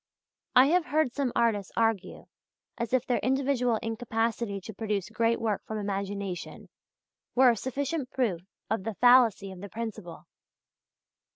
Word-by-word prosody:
I 255 - +8
have 350 0 +3
heard 300 -4 +1
some 275 -3 -1
artists 210 -4 +1
argue 225 -4 0 0.5
as 235 - -4
if 255 -1 +2
their 245 - +1
individual 260 -3 +1
incapacity 225 -2 -2
to 220 - -9
produce 210 -1 -3
great 230 +1 +1
work 220 -3 -1
from 220 - -4
imagination 200 -2 -4 0.7
were 255 0 +7
a - - -1
sufficient 270 +4 -3
proof 220 -12 -1 0.3
of 220 -2 -1
the 225 0 -4
fallacy 240 -5 +5
of 185 -1 -10
the 200 - -7
principle. 215 -8 -7
225 Hz, 145 wpm, -28 LUFS, 205-250 Hz, 0.7 s, I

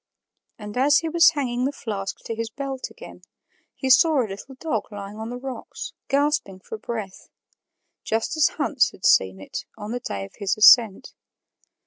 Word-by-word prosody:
And 210 +1 -8
as 280 +3 +5
he 325 - -1
was 335 0 +6
hanging 255 -5 -2
the 275 - 0
flask 200 -7 -5
to - - -3
his 225 0 -4
belt 270 +2 -5
again, - - -13 0.5
he 265 -1 -1
saw 310 +2 +5
a 245 - +2
little 205 +7 -9
dog 310 -3 -3
lying 205 0 -8
on 220 +1 -5
the 245 - -5
rocks, 260 0 -7
gasping 280 -9 0
for 215 +3 -8
breath 215 -4 -6 0.7
just 225 +7 -1
as 310 -1 +4
Hans 285 -3 +2
had - - -10
seen 95 0 +4
it 95 - -6
on 210 0 -7
the 245 - -2
day 100 - -5
of 100 - -15
his 200 +2 0
ascent. 215 -2 +6
235 Hz, 175 wpm, -24 LUFS, 205-275 Hz, 0.7 s, was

